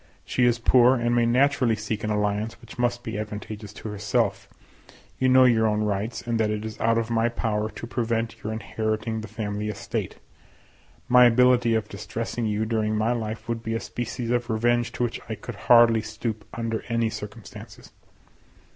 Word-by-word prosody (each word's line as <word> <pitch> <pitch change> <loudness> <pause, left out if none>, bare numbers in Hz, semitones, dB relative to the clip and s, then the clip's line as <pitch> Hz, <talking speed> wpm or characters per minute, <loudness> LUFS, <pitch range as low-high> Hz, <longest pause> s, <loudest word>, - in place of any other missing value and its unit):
She 125 - +1
is 120 -1 +3
poor, 125 +2 +5
and 120 -1 0
may 120 -1 +3
naturally 125 -1 +3
seek 105 0 -4
an 110 - -1
alliance 105 +1 -1
which 115 0 -13
must 120 0 0
be 110 -3 -4
advantageous 105 0 -6
to 110 - -7
herself; 105 0 -1 0.7
you 130 - +3
know 130 0 +7
your 115 -3 +4
own 105 0 +1
rights, 105 +2 -2
and 115 -1 -1
that 110 -1 +2
it 105 0 -3
is 110 -1 -7
out 115 0 +2
of 115 0 -1
my 115 0 +2
power 110 -2 -1
to 115 - -8
prevent 115 -1 -2
your 110 - -3
inheriting 110 +1 -2
the 110 - -7
family 105 -1 -4
estate. 105 -2 -4 0.9
My 125 0 +7
ability 120 -1 +4
of 110 -1 -1
distressing 115 +4 -4
you 105 +1 0
during 110 -1 0
my 110 +2 +1
life 110 -2 -4
would 115 -1 -2
be 115 0 -3
a - - 0
species 120 0 -4
of 120 0 0
revenge 120 +2 +1
to - - -2
which 120 -1 -2
I 110 - -2
could 120 - -8 0.2
hardly 115 -2 +7
stoop 110 -1 -5
under 115 -1 -3
any 115 -1 +1
circumstances. 105 -1 -10
115 Hz, 185 wpm, -25 LUFS, 110-120 Hz, 0.9 s, know